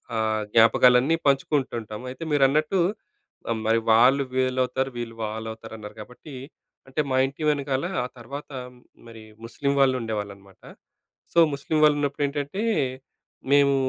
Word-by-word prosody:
ఆహ్, 110 -1 0
జ్ఞాపకాలన్నీ 125 +6 +5
పంచుకుంటుంటాం. 130 -6 -1
అయితే 130 - -8
మీరన్నట్టు, 150 +6 +2 0.9
మరి 115 +1 +3
వాళ్ళు 125 +5 +5
వీల్లవుతారు, 130 0 0
వీళ్ళు 115 -1 -5
వాళ్ళవుతారు, 110 +1 -7
అన్నారు 105 -1 -10
కాబట్టి, 125 +6 -12 0.5
అంటే, 135 +3 -1
మా 130 - +2
ఇంటి 140 +4 -8
వెనకాల, 140 0 -1 0.2
ఆ - - -4
తర్వాత, 140 +5 -8 0.6
మరి, 115 -1 -12 0.2
ముస్లిం 140 +4 -2
వాళ్ళు 130 -1 +4
ఉండేవాళ్ళనమాట. 100 -3 -6 0.7
సో, 170 - +4
ముస్లిం 140 +3 -1
వాళ్ళు 150 -1 +4
ఉన్నప్పుడు 145 0 -1
ఏంటంటే, 145 +8 -4 0.9
మేము 140 -1 +5
130 Hz, 120 wpm, -24 LUFS, 115-140 Hz, 0.9 s, జ్ఞాపకాలన్నీ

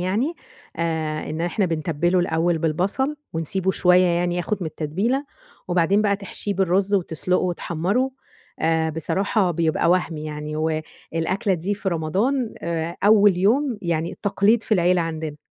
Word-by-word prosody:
يعني، 215 - 0 0.4
آآ 160 -2 -2
إن 155 +2 -4
إحنا 175 +3 0
بنتبله 165 +2 0
الأول 170 -1 +1
بالبصل، 190 - 0 0.2
ونسيبه 175 +4 0
شوية 180 0 +4
يعني 175 0 +1
ياخد 180 +4 -1
من 175 - -2
التتبيلة، 195 - -1 0.4
وبعدين 180 +4 +3
بقى 200 -1 +2
تحشيه 200 0 -5
بالرز 190 +2 +1
وتسلقه 180 0 0
وتحمره، 185 +8 -1 0.5
آآ 160 0 +1
بصراحة 190 +5 0
بيبقى 165 0 +1
وهمي 170 -4 0
يعني. 150 0 -5
والأكلة 165 +4 -2
دي 180 +5 -2
في 200 -1 -3
رمضان 205 - 0
آآ 170 0 -3
أول 205 -3 +6
يوم 235 +6 +2
يعني 170 -1 -2
تقليد 205 +3 +3
في 220 - +1
العيلة 180 -1 +3
عندنا. 160 -2 -4
175 Hz, 140 wpm, -23 LUFS, 160-200 Hz, 0.5 s, أول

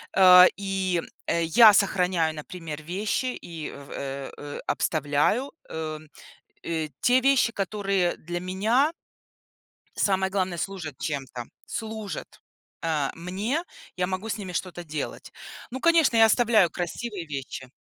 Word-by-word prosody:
А, 180 -1 +9
и, 190 -3 -1 0.3
э, 170 0 +1
я 215 +6 +8
сохраняю, 180 -5 +2
например, 155 -1 -7
вещи 205 +9 -1
и 165 -3 -7
в 140 -1 -12
э 135 0 -5
э, 145 0 -7
обставляю, 155 - +1 0.2
эм, 155 -1 -5 0.6
э, 160 -2 -2
те 250 +1 +4
вещи, 265 -3 +3
которые 195 -2 0
для 175 +2 -5
меня 220 - +1 1.0
самое 190 -1 +1
главное, 185 -3 -1
служат 170 -6 -5
чем-то, 135 -5 -4 0.2
служат, 220 -2 -6 0.4
а, 155 -4 0
мне. 200 - -2 0.3
Я 180 0 0
могу 190 +4 -4
с 220 - -2
ними 190 -3 -6
что-то 175 0 -4
делать. 155 -2 -6 0.4
Ну, 260 - -4
конечно, 325 -5 +4
я 225 - +8
оставляю 220 -5 +4
красивые 180 +3 -5
вещи. 135 -3 -6
185 Hz, 130 wpm, -26 LUFS, 160-210 Hz, 1.0 s, А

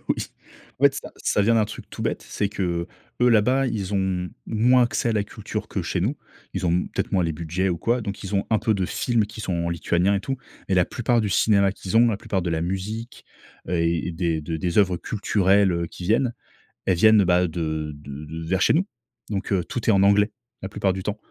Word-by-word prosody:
Oui. - - +2 0.6
En - - +1
fait, - - +6
ça - - -6
ça 105 - +1
vient 115 +3 +3
d'un 110 - +4
truc 105 - -9
tout - - -6
bête, - - -2
c'est 100 - -1
qu'eux 85 -4 -2 0.3
là-bas, 125 +3 +4
ils 105 -4 -2
ont 95 -2 0 0.2
moins 125 +3 +4
accès 120 0 0
à - - +2
la 105 -2 +1
culture - - -6
que - - -3
chez - - -2
nous. - - 0 0.4
Ils 95 -1 -1
ont, 85 - +2
mmh, 90 - 0
peut-être - - -3
moins 90 -3 +2
les 80 - -1
budgets 85 +4 -2
ou 85 - -2
quoi, 120 +7 +1
donc 100 -1 -5
ils 100 +1 -4
ont 100 - +1
un 110 - +4
peu 110 - +1
de 95 -2 0
films 115 -4 0
qui 110 - -9
sont 95 -4 -2
en 85 0 -1
lituanien 85 +3 +1
et 100 - 0
tout, 135 +5 -3 0.3
mais 95 - +2
la 90 -1 +4
plupart 120 -1 0
du 105 - -1
cinéma 100 -1 +3
qu'ils 100 +2 -3
ont, 120 +1 +6
la 110 - 0
plupart 95 -3 -2
de 85 - -2
la 80 -1 0
musique, 105 +6 -4 0.4
heu, - - -3
et 85 0 0
des 80 -2 -1
de 80 +1 -3
des 85 +3 0
œuvres 95 -4 +3
culturelles, 100 -2 +2
heu, 85 0 -1
qui 90 - -9
viennent, 115 +4 +2 0.5
elles 95 -3 +2
viennent, 110 +2 +6
heu, - - +2
bah, 90 0 +3
de 80 -2 -3
de 70 +1 -9
de 80 +1 -7
vers 95 +2 0
chez - - +4
nous, 185 +6 +2 0.4
donc 100 -1 -3
heu, 95 -3 +2
tout 115 +8 -5
est 110 - +6
en 95 - +4
anglais. 100 +2 +4 0.3
La 95 - -4
plupart 100 -1 0
du 95 - -5
temps, 105 +2 -3
95 Hz, 245 wpm, -24 LUFS, 85-110 Hz, 0.6 s, fait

